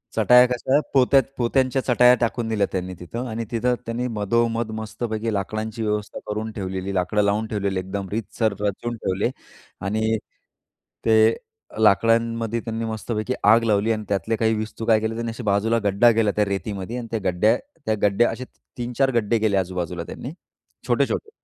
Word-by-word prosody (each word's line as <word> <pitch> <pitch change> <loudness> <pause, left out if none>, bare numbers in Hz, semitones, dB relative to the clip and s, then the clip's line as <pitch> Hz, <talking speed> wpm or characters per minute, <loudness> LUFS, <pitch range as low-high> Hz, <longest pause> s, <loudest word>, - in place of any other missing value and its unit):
चटाया 125 0 +6
कशा 125 +3 +1
पोत्यात 135 0 +5
पोत्यांच्या 130 +2 +1
चटाया 125 0 +5
टाकून 120 0 -1
दिल्या 105 -3 +1
त्यांनी 95 -1 -3
तिथं 115 +8 -5
आणि 115 0 -4
तिथं 125 +1 +1
त्यांनी 120 +2 -2
मधोमध 115 +2 0
मस्तपैकी 110 0 -3
लाकडांची 110 +3 -3
व्यवस्था 105 -1 -2
करून 110 +1 -3
ठेवलेली. 95 -1 -4
लाकडं 95 +3 +1
लावून 105 +2 +1
ठेवलेली. 100 -3 -1
एकदम 95 +1 -4
रीतसर 110 0 -1
रचून 105 +4 -2
ठेवले. 95 +1 -1 0.6
आणि 110 +2 0 0.9
ते 110 0 +5 0.4
लाकडांमध्ये 115 +2 +2
त्यांनी 115 0 -3
मस्तपैकी 110 +2 -3
आग 110 +3 +6
लावली 110 0 +2
आणि 110 -1 -1
त्यातले 100 +3 0
काही 110 0 +1
विस्तू 110 +1 -5
काय 110 -1 +4
केले 110 +1 -2
त्यांनी 115 0 -3
असे 115 +2 -8
बाजूला 110 +3 +2
गड्डा 100 +4 +4
केला 110 -2 +2
त्या 105 - +2
रेतीमध्ये. 100 +2 -4
आणि 120 -2 -5
त्या 115 - -1
गड्ड्या 105 +5 +3 0.3
त्या 110 - +1
गड्ड्या 105 +3 +3
असे 130 - -6 0.3
3-4 125 +2 0
गड्डे 115 0 +2
केले 105 -2 +2
आजूबाजूला 90 -2 -2
त्यांनी. 125 +9 -7 0.6
छोटे-छोटे 440 - 0
110 Hz, 160 wpm, -23 LUFS, 100-115 Hz, 0.9 s, चटाया